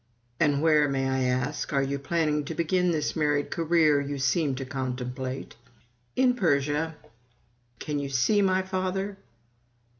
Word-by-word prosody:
"And 145 -2 +2
where, 150 -3 +4
may 135 -1 0
I 130 0 0
ask, 130 +4 -2
are 135 -1 +2
you 140 +1 -2
planning 150 0 0
to 160 - -5
begin 180 +3 +1
this 155 -3 -1
married 150 -2 0
career 160 -3 +3
you 140 0 -4
seem 140 +1 +1
to 135 +1 -5
contemplate?" 130 0 -4 0.6
"In 255 -1 +4
Persia." 150 - 0 0.8
Can 150 +2 -3
you 140 -1 -4
see 135 - +2
my 190 -1 +2
father? 190 +1 -2
150 Hz, 145 wpm, -27 LUFS, 135-170 Hz, 0.8 s, where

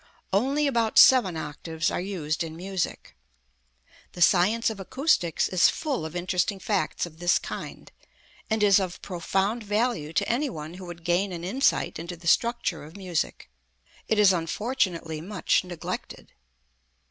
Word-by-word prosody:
Only 270 +9 +2
about 235 -5 +1
seven 215 -10 +7
octaves 160 +1 -3
are - - -2
used 170 -5 -2
in 160 -1 -7
music. 185 -1 -4 1.0
The 175 - -8
science 220 +8 +3
of 215 - -8
acoustics 195 - +1
is 185 -3 +4
full 275 - -2
of 160 - -11
interesting 180 +3 0
facts 200 -2 -1
of 160 -2 -13
this 175 0 +3
kind, - - -7 0.6
and 220 -1 +1
is 200 -1 +6
of 185 -2 -4
profound 195 +5 -1
value 210 -7 -1
to - - +1
any 270 +5 0
one 155 0 -7
who 185 +1 -9
would 170 -1 -9
gain 180 +3 +1
an 170 -1 -6
insight 250 - +1
into 170 +1 -6
the 170 - -16
structure 235 -3 +1
of 155 +5 -12
music. 180 - -3 0.6
It 220 - +1
is 205 -2 +6
unfortunately 170 -3 -2
much 190 +2 0
neglected. 175 -3 -7
185 Hz, 150 wpm, -26 LUFS, 170-215 Hz, 1.0 s, seven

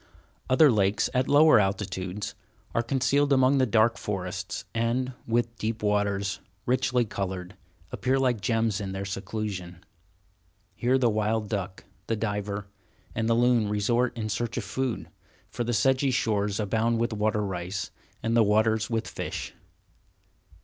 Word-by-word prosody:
Other 140 +2 +6
lakes, 100 -2 +1
at 130 +1 +1
lower 155 -2 +6
altitudes, 95 -1 -2 0.4
are 115 - +2
concealed 135 +3 +1
among 135 0 +4
the 130 - +3
dark 110 +1 +3
forests, 95 -2 -4
and, 120 +3 0
with 115 0 0
deep 110 0 -3
waters, 100 -1 0 0.3
richly 125 -1 +2
colored, 95 -2 -4 0.4
appear 130 +1 0
like 125 -5 +1
gems 115 -2 0
in 95 -1 -4
their 95 0 -4
seclusion. 95 -3 -5 0.9
Here 125 +2 +2
the 130 -2 +3
wild 110 0 0
duck, 95 -2 -4 0.2
the 115 - 0
diver, 105 -1 -3 0.5
and 115 0 -1
the 115 - +4
loon 120 -3 +3
resort 120 +4 +1
in 110 -2 -2
search 115 +3 -2
of 120 - -1
food, 125 +5 -3 0.4
for 120 +2 -2
the 120 - -2
sedgy 130 +5 +2
shores 105 -5 0
abound 115 +3 +1
with 115 0 0
water 105 0 0
rice, 95 0 -4 0.3
and 115 +1 +1
the 120 - +6
waters 110 +1 +2
with 115 -1 -1
fish. - - -5
110 Hz, 145 wpm, -27 LUFS, 100-120 Hz, 0.9 s, Other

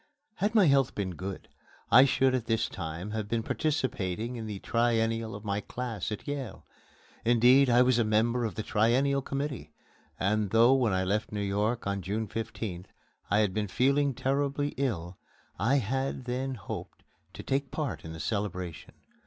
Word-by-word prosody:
Had 210 +3 0
my 210 -4 +6
health 140 -4 +3
been 95 -3 -2
good, 95 +2 -6 0.4
I 130 +3 +9
should 130 -1 +2
at 120 -3 -1
this 115 -1 +1
time 85 +3 -6
have 110 -1 -3
been 115 -1 0
participating 120 - -1
in 115 -2 -5
the 105 -2 -4
Triennial 115 0 0
of 105 +1 -9
my 100 0 -1
class 115 -3 -4
at 105 - -6
Yale. 145 -2 -5 0.6
Indeed, 125 +3 +5
I 120 +1 +6
was 125 -1 +3
a - - +4
member 115 +3 +2
of 110 -5 -2
the 110 - -3
Triennial 130 +7 +2
Committee 135 - -4 0.5
and 105 +1 +1
though, 115 +5 +5
when 125 -5 +2
I 95 0 +1
left 105 +4 -1
New 105 - -3
York 105 +4 -1
on 100 -1 -1
June 105 +4 -2
15th, 100 -4 -5 0.4
I 105 +2 +4
had 100 -3 +1
been 105 0 -1
feeling 140 +5 +2
terribly 140 +2 0
ill, 95 - -3 0.4
I 115 +9 +3
had 130 +1 -1
then 130 +2 -2
hoped 105 - -8 0.3
to - - -7
take 135 0 -1
part 150 -5 -3
in 80 - -7
the 80 - -8
celebration. 90 -2 -4
115 Hz, 175 wpm, -29 LUFS, 100-130 Hz, 0.6 s, I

